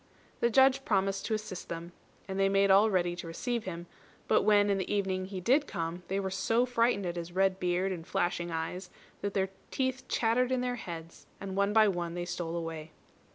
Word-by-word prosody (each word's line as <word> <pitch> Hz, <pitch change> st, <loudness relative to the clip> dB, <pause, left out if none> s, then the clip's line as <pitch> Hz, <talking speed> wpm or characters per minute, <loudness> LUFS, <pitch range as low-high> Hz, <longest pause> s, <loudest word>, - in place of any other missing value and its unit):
The 235 Hz, -, +3 dB
Judge 265 Hz, +3 st, +5 dB
promised 195 Hz, -3 st, 0 dB
to 220 Hz, -, +1 dB
assist 210 Hz, -4 st, -6 dB
them, 170 Hz, +1 st, -6 dB, 0.4 s
and 190 Hz, 0 st, -3 dB
they 195 Hz, 0 st, +4 dB
made 195 Hz, 0 st, +4 dB
all 200 Hz, +3 st, +6 dB
ready 175 Hz, -3 st, +1 dB
to 175 Hz, -1 st, -6 dB
receive 235 Hz, +8 st, -3 dB
him; 175 Hz, -2 st, -5 dB, 0.4 s
but -, -, +4 dB
when 205 Hz, -1 st, +4 dB
in 195 Hz, -, +1 dB
the 190 Hz, -, -3 dB
evening 190 Hz, -2 st, 0 dB
he 190 Hz, 0 st, -6 dB
did 265 Hz, -, +3 dB
come, 165 Hz, +1 st, -4 dB
they 195 Hz, +1 st, -1 dB
were 190 Hz, -1 st, -2 dB
so 225 Hz, +5 st, +2 dB
frightened 235 Hz, -4 st, +1 dB
at 175 Hz, 0 st, -3 dB
his 170 Hz, 0 st, -5 dB
red 190 Hz, 0 st, +2 dB
beard 180 Hz, +1 st, 0 dB
and 175 Hz, -3 st, -5 dB
flashing 175 Hz, 0 st, -1 dB
eyes 170 Hz, +3 st, -4 dB, 0.3 s
that 200 Hz, -1 st, -3 dB
their 190 Hz, -1 st, +1 dB, 0.2 s
teeth 260 Hz, -1 st, -2 dB
chattered 245 Hz, +2 st, +1 dB
in 255 Hz, -1 st, +1 dB
their 250 Hz, 0 st, -1 dB
heads, 165 Hz, -5 st, -8 dB
and 195 Hz, -1 st, -5 dB
one 200 Hz, +1 st, +2 dB
by 215 Hz, 0 st, +6 dB
one 175 Hz, -3 st, -2 dB
they 175 Hz, 0 st, -3 dB
stole 170 Hz, -1 st, -4 dB
away. 165 Hz, -2 st, -5 dB
195 Hz, 210 wpm, -30 LUFS, 175-215 Hz, 0.4 s, all